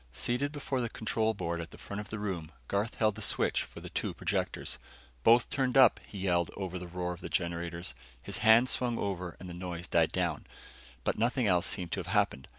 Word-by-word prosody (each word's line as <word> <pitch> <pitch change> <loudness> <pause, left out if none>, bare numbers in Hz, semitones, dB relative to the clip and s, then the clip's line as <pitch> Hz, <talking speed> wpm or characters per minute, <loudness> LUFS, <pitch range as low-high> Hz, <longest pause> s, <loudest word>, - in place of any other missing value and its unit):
Seated 125 - -1
before 140 -3 -2
the 120 - -1
control 110 0 0
board 85 -3 -2
at 85 - -7
the - - -13
front 100 - -6
of 105 - -10
the 110 - -4
room, 90 -6 -3 0.2
Garth 100 +3 0
held 110 -1 +3
the 110 - -8
switch - - +1
for - - -8
the - - -7
two - - -2
projectors. - - -2 0.4
"Both 115 - +5
turned 130 -1 +1
up," 130 -4 +7
he 105 - -9
yelled 90 -3 +1
over 95 -2 -3
the 90 - -7
roar 90 0 -3
of 90 - -11
the - - -5
generators. 85 0 -2 0.3
His - - -4
hands 115 +3 +6
swung 120 -2 +1
over 90 -4 -3
and 90 - -8
the 90 - -6
noise 85 -1 -5
died - - +3
down, - - -1 0.6
but - - 0
nothing 120 +2 +2
else 90 -3 +3
seemed 90 -4 -3
to 95 - -1
have 90 - -5
happened. 100 -8 +1
100 Hz, 220 wpm, -31 LUFS, 85-115 Hz, 0.6 s, up